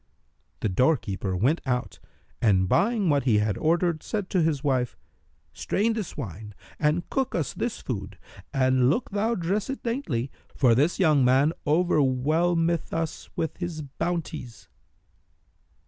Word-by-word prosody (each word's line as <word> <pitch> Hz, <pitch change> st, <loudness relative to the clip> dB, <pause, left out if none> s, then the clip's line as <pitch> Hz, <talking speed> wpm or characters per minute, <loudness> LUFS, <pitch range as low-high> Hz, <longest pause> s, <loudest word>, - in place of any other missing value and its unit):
The 110 Hz, -, 0 dB
doorkeeper 100 Hz, -, 0 dB
went 135 Hz, -, +2 dB
out 125 Hz, -3 st, -2 dB, 0.4 s
and, 95 Hz, -5 st, +3 dB
buying 205 Hz, -, +2 dB
what 145 Hz, -4 st, +2 dB
he 115 Hz, -5 st, +4 dB
had 105 Hz, -1 st, +1 dB
ordered, 170 Hz, 0 st, +1 dB
said 205 Hz, -4 st, -4 dB
to 185 Hz, -, +2 dB
his 155 Hz, -4 st, 0 dB
wife, 130 Hz, -4 st, 0 dB, 0.6 s
"Strain 225 Hz, +3 st, 0 dB
this 215 Hz, -5 st, -5 dB
wine 105 Hz, +2 st, -7 dB, 0.2 s
and 160 Hz, +3 st, +1 dB
cook 265 Hz, -1 st, -1 dB
us 160 Hz, -6 st, -1 dB
this 235 Hz, -1 st, -3 dB
food 100 Hz, -6 st, -5 dB, 0.3 s
and 130 Hz, -2 st, +3 dB
look 215 Hz, -, 0 dB
thou 215 Hz, +4 st, 0 dB
dress 195 Hz, +5 st, -1 dB
it 270 Hz, -, -5 dB
daintily, 165 Hz, -, -2 dB, 0.2 s
for 125 Hz, -4 st, +4 dB
this 145 Hz, +9 st, +2 dB
young 155 Hz, -7 st, +4 dB
man 135 Hz, +5 st, +4 dB
overwhelmeth 165 Hz, +2 st, +2 dB
us 165 Hz, -1 st, -3 dB
with 160 Hz, -, -2 dB
his 170 Hz, -3 st, -4 dB
bounties." 145 Hz, -4 st, -5 dB
150 Hz, 140 wpm, -26 LUFS, 125-175 Hz, 0.6 s, he